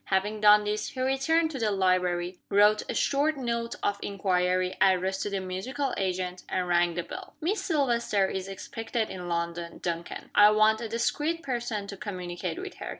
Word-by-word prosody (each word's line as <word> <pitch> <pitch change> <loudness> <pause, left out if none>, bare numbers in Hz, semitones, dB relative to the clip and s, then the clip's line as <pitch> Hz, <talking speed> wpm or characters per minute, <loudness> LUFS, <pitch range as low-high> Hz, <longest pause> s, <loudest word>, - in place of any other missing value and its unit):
Having 205 +2 0
done 210 0 +7
this, 210 +1 -2
he 260 - -8
returned 275 +5 +2
to 270 - -5
the 220 -2 +1
library 180 -2 +1
wrote 210 +1 +5
a - - -1
short 290 +2 +1
note 235 -2 -2
of 205 0 0
inquiry, 185 -2 0
addressed 190 0 +3
to - - -2
the 200 -1 -2
musical 230 +10 -3
agent 185 -1 -2
and 180 -1 -1
rang 175 -1 +2
the 175 - -2
bell. - - -9
"Miss 380 +7 -1
Silvester 240 - +1
is 190 0 -4
expected 225 +3 -4
in 180 -1 -6
London, 170 0 -3
Duncan. 170 -1 -5
I 205 0 +8
want 215 +1 +4
a 230 - -4
discreet 300 +8 -1
person 240 -6 -3
to 200 0 -8
communicate 180 - -5
with 375 +1 -7
her. - - -6
205 Hz, 180 wpm, -28 LUFS, 185-235 Hz, -, I